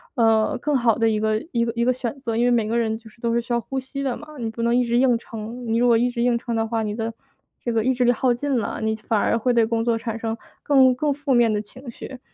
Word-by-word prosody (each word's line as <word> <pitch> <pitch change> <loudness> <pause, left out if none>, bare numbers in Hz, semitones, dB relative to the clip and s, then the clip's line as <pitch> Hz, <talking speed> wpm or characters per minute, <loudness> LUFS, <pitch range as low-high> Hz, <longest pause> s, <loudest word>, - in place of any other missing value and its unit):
呃， 225 -3 +3
更 290 +1 +1
好 235 -3 +2
的 225 -1 +3
一 215 -1 0
个 215 +2 0
一 235 -2 +1
个 230 - -2
一 235 - +1
个 250 - +3
选 255 +1 -4
择。 230 -4 -2
因 240 - +2
为 245 - +3
每 230 -3 +1
个 230 - 0
人 220 -1 0 0.2
都 235 -1 0
是 235 - +2
需 235 - -10
要 235 - +2
呼 265 +3 -4
吸 275 +2 -6
的 265 -3 -1
嘛， 300 0 -11
你 230 -2 -2
不 225 +1 -6
能 235 0 +2
一 250 - +2
直 235 0 +1
硬 250 -1 +4
撑， 230 +2 -8
你 225 0 +1
如 245 +1 +3
果 235 -1 +5
一 245 +2 +2
直 240 -1 -3
硬 240 0 +2
撑 235 0 -4
的 225 0 +1
话， 225 0 -1
你 210 -1 -3
的 225 0 -3 0.5
这 240 - 0
个 225 -1 +1
意 260 +3 +2
志 250 0 +1
力 245 - +5
耗 245 +1 +2
尽 265 +1 -1
了， 220 - -3
你 220 0 0
反 215 0 -1
而 230 - +2
会 245 +2 +1
对 235 -2 +4
工 225 0 -1
作 230 -1 +1
产 225 -1 -4
生 225 0 -3 0.3
更 265 -3 +5
更 290 +3 0
负 280 -1 -1
面 240 -2 +4
的 210 -1 0
情 250 +4 -11
绪。 260 +2 -9
235 Hz, 325 characters per minute, -23 LUFS, 225-250 Hz, 0.5 s, 果